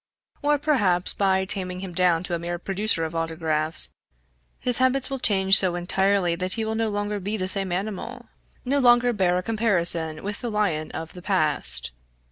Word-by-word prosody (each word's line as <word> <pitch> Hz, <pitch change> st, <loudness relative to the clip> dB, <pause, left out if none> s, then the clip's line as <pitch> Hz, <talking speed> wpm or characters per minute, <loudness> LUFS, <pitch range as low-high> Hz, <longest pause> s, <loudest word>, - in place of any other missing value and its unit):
Or, 295 Hz, 0 st, +2 dB
perhaps, 205 Hz, -, +1 dB
by 190 Hz, -1 st, +1 dB
taming 185 Hz, -2 st, -4 dB
him 190 Hz, -2 st, -7 dB
down 180 Hz, -2 st, +2 dB
to 180 Hz, -, -5 dB
a 170 Hz, -, -1 dB
mere 175 Hz, +1 st, -4 dB
producer 195 Hz, 0 st, -1 dB
of 160 Hz, -, -6 dB
autographs, 160 Hz, -1 st, -1 dB, 0.7 s
his 250 Hz, -1 st, 0 dB
habits 260 Hz, +1 st, +1 dB
will 270 Hz, -, -3 dB
change 195 Hz, -4 st, +7 dB
so 185 Hz, -2 st, +1 dB
entirely 190 Hz, 0 st, 0 dB
that 185 Hz, +1 st, -3 dB
he 225 Hz, -1 st, -2 dB
will 220 Hz, -, -2 dB
no 225 Hz, 0 st, -1 dB
longer 205 Hz, 0 st, -3 dB
be 205 Hz, +3 st, -3 dB
the 185 Hz, -2 st, -3 dB
same 195 Hz, -1 st, -2 dB
animal, 215 Hz, +6 st, -5 dB, 0.4 s
no 280 Hz, +3 st, +1 dB
longer 245 Hz, -1 st, +4 dB
bear 180 Hz, -4 st, +1 dB
a 180 Hz, -, -3 dB
comparison 175 Hz, -8 st, 0 dB
with 205 Hz, +1 st, -5 dB
the 240 Hz, -, -3 dB
lion 200 Hz, -8 st, -1 dB
of 160 Hz, 0 st, -7 dB
the 180 Hz, -, -11 dB
past. 150 Hz, -, -1 dB
190 Hz, 185 wpm, -24 LUFS, 175-220 Hz, 0.7 s, change